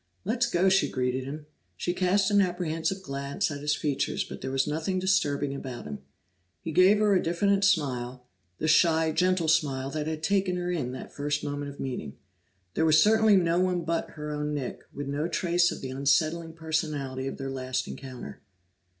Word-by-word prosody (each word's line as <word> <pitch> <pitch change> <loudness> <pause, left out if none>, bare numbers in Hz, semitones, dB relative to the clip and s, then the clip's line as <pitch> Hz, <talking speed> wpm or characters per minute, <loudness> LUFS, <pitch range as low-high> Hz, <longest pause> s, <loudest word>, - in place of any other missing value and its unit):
"Let's 235 +4 +1
go!" 185 -2 +2
she 190 +1 +4
greeted 130 0 -1
him. 150 +2 -7 0.3
She 175 - -1
cast 190 +2 +2
an 205 0 +5
apprehensive 180 0 -1
glance 140 +5 -2
at 140 -1 -6
his 150 0 +1
features, 145 -3 -1
but - - -9
there 130 - -3
was 135 0 +1
nothing 160 +5 -2
disturbing 145 -7 +1
about 130 -3 -6
him. 70 -1 -6 0.6
He 165 - -5
gave 185 +6 +6
her 210 -1 +3
a 185 - +3
diffident 200 +4 +1
smile, 130 -9 0 0.3
the 155 - -2
shy, 160 0 +4
gentle 180 +1 +2
smile 140 -4 +1
that 150 0 -3
had 160 0 -4
taken 195 -1 +1
her 180 0 -2
in 145 -8 -2
that 130 - -8
first 145 0 -2
moment 145 0 -3
of 140 - -11
meeting. 100 - -5 0.6
This - - +1
was 155 -1 +6
certainly 220 0 +5
no 175 -2 +3
one 180 -1 +1
but 165 +1 -1
her 150 0 -5
own 150 0 -2
Nick, 135 -4 -4
with 145 - -5
no 145 +3 -1
trace 175 0 +2
of - - -6
the 130 - -5
unsettling 155 +5 +1
personality 155 -5 -2
of - - -5
their 135 -1 -4
last 130 -1 -2
encounter. 130 -2 -8
155 Hz, 190 wpm, -27 LUFS, 140-180 Hz, 0.6 s, gave